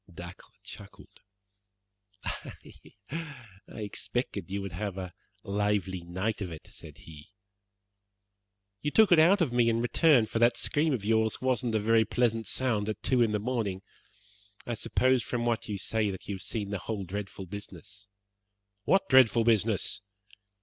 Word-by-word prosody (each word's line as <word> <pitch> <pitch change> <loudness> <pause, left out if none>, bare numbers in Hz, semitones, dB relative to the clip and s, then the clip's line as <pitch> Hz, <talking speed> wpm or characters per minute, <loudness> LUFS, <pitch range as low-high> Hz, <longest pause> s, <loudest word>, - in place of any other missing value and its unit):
Dacre 85 +1 -10 0.2
chuckled. - - -12 1.0
"I - - -5 1.1
expected 105 -1 -4
that - - -15
you 100 - -1
would 100 -1 -5
have 95 +2 -4
a 90 -2 -6 0.3
lively 100 -2 -1
night 95 +6 -3
of 90 -4 -4
it," 80 - -9
said - - -12
he. 75 -2 -13 1.5
"You 150 - 0
took 215 +5 +5
it 170 - +7
out 180 +5 +5
of 140 -8 +1
me 120 -1 +4
in 115 0 +1
return, 120 +1 +4
for 115 - -3
that 120 +1 +4
scream 155 +2 +2
of 115 -7 -2
yours 110 0 +2
wasn't 125 -3 0
a - - +3
very 110 +2 +4
pleasant 115 -2 0
sound 110 -3 0
at 105 0 -5
two 130 -2 +2
in 115 -2 +3
the 105 - +1
morning. 105 -4 -2 0.8
I - - -3
suppose 130 -1 +2
from 120 +2 -2
what 115 -2 -1
you 105 - -2
say 110 +1 0
that 95 -2 -7
you 100 - -3
have 95 - -6
seen 105 -1 -3
the 100 - -2
whole 105 +2 -4
dreadful 95 +1 -6
business." 100 +1 -9 0.8
"What 195 - +3
dreadful 125 -5 +6
business?" 110 -2 +2
110 Hz, 160 wpm, -29 LUFS, 100-120 Hz, 1.5 s, it